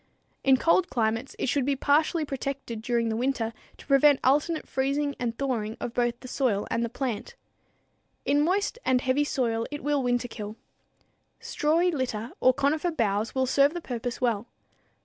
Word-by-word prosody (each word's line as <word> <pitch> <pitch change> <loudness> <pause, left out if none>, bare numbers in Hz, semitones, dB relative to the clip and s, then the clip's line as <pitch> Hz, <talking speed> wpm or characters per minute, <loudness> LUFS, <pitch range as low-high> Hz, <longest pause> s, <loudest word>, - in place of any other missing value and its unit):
In 265 -1 +5
cold 345 +5 +3
climates 225 0 -1
it - - -2
should 275 +2 +1
be 280 +2 +1
partially 305 +4 +2
protected 270 -4 -4
during 235 0 0
the 220 - -1
winter 235 -2 -1 0.2
to - - -14
prevent 280 0 +5
alternate 300 +4 +2
freezing 280 +2 0
and 235 -2 -2
thawing 230 -5 -2
of 235 - -4
both 240 -1 0
the 255 - -9
soil 245 -6 0
and 230 - +1
the 235 - -2
plant. 240 -3 -4 0.9
In 285 +1 +3
moist 390 +8 0
and 255 -1 +2
heavy 260 +3 +2
soil 230 -5 -1
it 290 0 -6
will 290 -1 +1
winterkill. 245 -4 -2 0.8
Strawy 335 +4 +1
litter 245 -5 -3
or 255 - +5
conifer 290 +6 0
boughs 220 -7 -1
will 260 0 +2
serve 280 +4 +3
the - - -2
purpose 245 -3 -4
well. 235 -3 0
260 Hz, 170 wpm, -27 LUFS, 235-285 Hz, 0.9 s, In